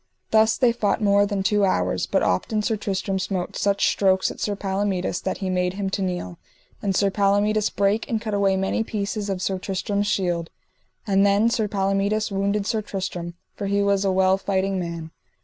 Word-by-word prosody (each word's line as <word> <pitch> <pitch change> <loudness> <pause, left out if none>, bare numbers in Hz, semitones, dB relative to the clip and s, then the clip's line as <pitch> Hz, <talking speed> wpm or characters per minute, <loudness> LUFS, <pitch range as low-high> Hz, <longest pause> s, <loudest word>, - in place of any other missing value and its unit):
Thus 220 0 +4
they 250 -3 +4
fought 215 -3 0
more 205 -1 +3
than 200 -2 -2
two 205 +1 +2
hours, 90 - +1
but - - +1
often 210 - 0
Sir 220 - +1
Tristram 195 -2 -2
smote 185 -1 -3
such 200 0 +1
strokes 190 -1 +2
at - - -11
Sir 205 - -1
Palomides 195 -2 -1
that - - -2
he - - -1
made 180 0 0
him 195 -1 -2
to 195 - -2
kneel; 180 - -3 0.4
and 195 -2 -1
Sir 200 0 +2
Palomides 205 +2 +2
brake 200 +2 0
and 225 - 0
cut 215 -1 -4
away 195 -1 +2
many 195 +4 0
pieces 205 -1 -3
of 190 -1 -2
Sir 190 -1 -1
Tristram's 200 +2 -2
shield; 175 -5 -1 0.6
and 195 -2 +3
then 200 +3 +3
Sir 220 -2 0
Palomides 200 +1 0
wounded 200 +1 0
Sir 220 0 0
Tristram, 180 -4 -5 0.2
for 200 - -4
he 200 0 +1
was 200 0 +2
a 195 - +2
well 190 0 +3
fighting 195 -1 -1
man. 170 -2 -5
200 Hz, 195 wpm, -23 LUFS, 190-205 Hz, 0.6 s, Thus